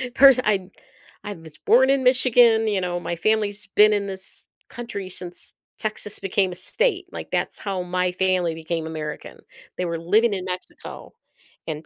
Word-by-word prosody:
pers 270 Hz, -2 st, +8 dB
I'd 195 Hz, -3 st, 0 dB, 0.5 s
I 205 Hz, -, -5 dB
was 160 Hz, -4 st, -13 dB
born 260 Hz, +3 st, +5 dB
in 275 Hz, -1 st, +2 dB
Michigan, 245 Hz, -3 st, +4 dB
you 200 Hz, -3 st, 0 dB
know, 175 Hz, -1 st, -2 dB
my 175 Hz, -, -4 dB
family's 205 Hz, +1 st, 0 dB
been 210 Hz, 0 st, +7 dB
in 200 Hz, -1 st, -1 dB
this 190 Hz, -1 st, -4 dB, 0.2 s
country 235 Hz, -6 st, -6 dB
since 180 Hz, -1 st, -5 dB, 0.2 s
Texas 215 Hz, -1 st, -3 dB
became 195 Hz, -1 st, 0 dB
a 175 Hz, -, -7 dB
state, 375 Hz, -, 0 dB
like, -, -, -7 dB
that's -, -, -1 dB
how 195 Hz, -3 st, -3 dB
my 180 Hz, 0 st, 0 dB
family 180 Hz, -3 st, 0 dB
became 160 Hz, 0 st, -4 dB
American. 155 Hz, -1 st, -6 dB, 0.4 s
They 180 Hz, -, -1 dB
were 170 Hz, -1 st, -3 dB
living 210 Hz, +6 st, +3 dB
in 185 Hz, -2 st, -4 dB
Mexico, 185 Hz, 0 st, -8 dB, 0.5 s
and 155 Hz, 0 st, -5 dB
190 Hz, 165 wpm, -23 LUFS, 175-220 Hz, 0.5 s, pers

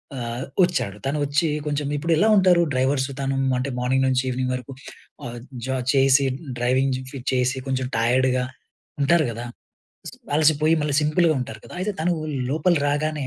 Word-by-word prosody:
ఆహ్, 120 Hz, 0 st, -4 dB, 0.2 s
వచ్చాడు. 165 Hz, -, -1 dB
తను 140 Hz, +2 st, -1 dB
వచ్చి 145 Hz, +3 st, +1 dB, 0.2 s
కొంచెం 145 Hz, -1 st, -1 dB
ఇప్పుడు 165 Hz, +3 st, -2 dB
ఎలా 210 Hz, -, +4 dB
ఉంటారు 180 Hz, -2 st, +5 dB
డ్రైవర్స్ 130 Hz, +1 st, +1 dB
తను 135 Hz, 0 st, -1 dB, 0.2 s
అంటే 130 Hz, +2 st, -2 dB
మార్నింగ్ 130 Hz, +2 st, +1 dB
నుంచి 130 Hz, 0 st, +1 dB
ఈవినింగ్ 125 Hz, 0 st, -1 dB
వరకు 125 Hz, +1 st, -7 dB, 0.5 s
ఆహ్, 120 Hz, 0 st, -6 dB, 0.3 s
జ 130 Hz, -, -6 dB, 0.2 s
చేసి, 135 Hz, 0 st, +4 dB, 0.3 s
డ్రైవింగు 130 Hz, +1 st, -1 dB
చేసి, 130 Hz, +1 st, +1 dB
కొంచెం 130 Hz, -1 st, -1 dB
టైర్డ్‌గా 125 Hz, +2 st, +2 dB, 0.6 s
ఉంటారు 155 Hz, +3 st, +3 dB
కదా! 120 Hz, +2 st, -6 dB, 0.6 s
సీ -, -, -9 dB, 0.2 s
అలసిపోయి 155 Hz, +1 st, +3 dB
మళ్ళీ 150 Hz, -2 st, -1 dB
సింపుల్‌గా 155 Hz, +2 st, +2 dB
ఉంటారు 110 Hz, -3 st, -6 dB
కదా! -, -, -11 dB
అయితే 210 Hz, +2 st, -1 dB
తను 175 Hz, +2 st, +1 dB, 0.4 s
లోపలి 160 Hz, +3 st, +2 dB
రాగానే, 150 Hz, -1 st, -1 dB
135 Hz, 155 wpm, -23 LUFS, 130-155 Hz, 0.6 s, ఉంటారు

